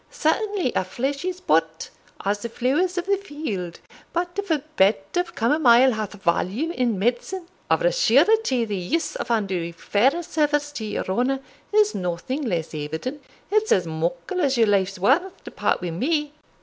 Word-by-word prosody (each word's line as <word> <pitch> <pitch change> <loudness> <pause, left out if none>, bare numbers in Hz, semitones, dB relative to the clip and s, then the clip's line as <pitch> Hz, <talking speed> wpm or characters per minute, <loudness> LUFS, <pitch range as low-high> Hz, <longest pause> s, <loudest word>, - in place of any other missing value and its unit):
Certainly 390 - 0
a' - - +1
flesh 270 - -3
is 370 -1 -3
but 165 - 0 0.3
as 205 +1 +1
the 235 - -5
flowers 300 +11 0
of 355 - -1
the 400 +1 +2
field; 290 - -5 0.3
but 350 +1 0
if 405 -1 -4
a 305 -4 +1
bed 200 +2 +5 0.2
of 355 -1 -1
camomile 250 0 +5
hath 215 -3 -3
value 200 - 0
in 245 - 0
medicine, 245 - -1 0.2
of - - +2
a - - +4
surety 445 - +3
the 210 -2 -3
use 195 - -2
of - - -4
Andrew 190 -7 0
Fairservice 295 - +1
to 225 -7 -5
your 210 - -3
honour 250 +8 0 0.3
is 420 0 +4
nothing 180 - -3
less 175 - -2
evident 160 - -4 0.3
it's 430 +1 +2
as 180 - +4
muckle 170 - -2
as 275 -4 +2
your 230 - +5
life's 195 -2 +1
worth 290 - +1
to - - -9
part - - 0
wi' 175 - -2
me." 295 - -1
250 Hz, 170 wpm, -23 LUFS, -, 0.3 s, bed